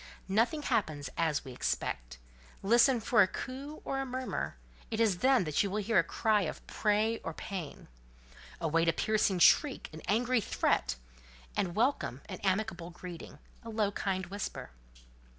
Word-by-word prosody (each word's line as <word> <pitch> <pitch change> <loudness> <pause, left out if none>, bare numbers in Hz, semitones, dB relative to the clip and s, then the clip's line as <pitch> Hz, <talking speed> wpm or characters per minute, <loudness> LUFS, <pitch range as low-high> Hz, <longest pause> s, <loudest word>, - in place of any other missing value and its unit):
Nothing 245 +9 +2
happens 155 - -1
as 160 -4 0
we 130 - -7
expect: - - -3 0.5
listen 235 +4 +5
for 225 +1 +4
a - - +6
coo 275 +8 -7
or 270 - -1
a - - 0
murmur; 255 0 -3 0.3
it 220 - -3
is 210 -6 +3
then 260 -8 +4
you 200 - +3
will 200 - -2
hear 215 -1 +3
a - - +4
cry 215 +5 +2
of 165 - -4
prey 215 +2 +1
or 165 - -6
pain. 185 -7 -6 0.7
Await 165 0 +1
a - - +2
piercing 215 -3 +1
shriek, 265 - +4
an 160 - -8
angry 245 +2 +2
threat, 60 - +1 0.6
and 175 -3 -1
welcome 225 - 0
an - - -6
amicable 190 -3 -1
greeting, 175 -4 -9 0.2
a 230 - -9
low 215 -2 0
kind 190 -2 -2
whisper. 195 - -5
205 Hz, 155 wpm, -31 LUFS, 170-230 Hz, 0.7 s, a